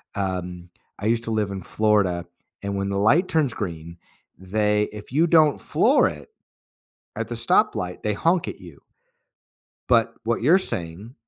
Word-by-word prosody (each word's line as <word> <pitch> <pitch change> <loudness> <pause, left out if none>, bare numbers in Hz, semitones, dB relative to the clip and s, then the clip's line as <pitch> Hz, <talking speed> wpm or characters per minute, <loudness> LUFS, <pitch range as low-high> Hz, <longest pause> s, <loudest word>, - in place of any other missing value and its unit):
Um, 90 -2 -4 0.3
I 105 - -5
used 115 0 +1
to 115 - -3
live 105 -2 -1
in 95 -1 -5
Florida, 100 -5 +1 0.4
and 100 0 -3
when 100 0 -2
the 100 - -2
light 145 - +3
turns 155 -7 +1
green, 85 -4 -6 0.4
they 105 +3 0
if 105 +2 -10
you 160 +5 +3
don't 155 -3 +4
floor - - +3
it - - -11 0.9
at - - -3
the - - -4
stoplight 90 0 0
they 105 - 0
honk 170 - +1
at - - -6
you. 85 -6 -14 1.1
But 115 -2 +3
what 115 0 -1
you're 170 +9 +5
saying 95 - -6
105 Hz, 160 wpm, -23 LUFS, 90-120 Hz, 1.1 s, you're